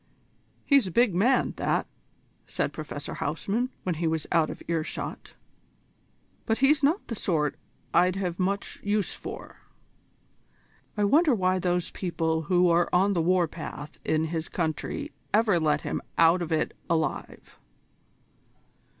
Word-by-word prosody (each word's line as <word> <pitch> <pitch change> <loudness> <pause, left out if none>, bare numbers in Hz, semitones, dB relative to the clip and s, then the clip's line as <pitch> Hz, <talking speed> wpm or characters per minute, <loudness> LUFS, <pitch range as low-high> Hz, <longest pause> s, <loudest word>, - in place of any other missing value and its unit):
"He's 275 -8 +4
a - - -5
big 235 0 +3
man, 240 +9 +2
that," - - 0 0.6
said - - -2
Professor - - -6
van - - -3
Huysman, 235 +5 -1
when 180 - 0
he 165 +1 -1
was 160 -1 -1
out 165 -2 +3
of - - -8
earshot, 165 -2 -4 1.1
"but 225 - +2
he's 275 +3 +4
not 305 +8 +2
the - - -4
sort 155 -9 0 0.4
I'd 180 +1 +4
have 180 -2 -3
much 195 +2 -2
use 205 0 0
for. - - -8 1.4
I 210 - +2
wonder 290 +6 +4
why 185 -2 +1
those 180 -1 0
people 165 -3 -1
who 180 -1 +4
are 170 0 +3
on 195 +3 +3
the 170 - +1
war 180 +1 +3
path 150 -2 -8
in 155 0 +1
his 160 0 -3
country 160 -4 -3 0.2
ever 210 -5 +3
let 155 -2 +1
him - - -3 0.2
out 165 +2 +5
of 170 -1 -4
it 160 - 0
alive?" 160 -2 -2
180 Hz, 145 wpm, -27 LUFS, 165-205 Hz, 1.4 s, out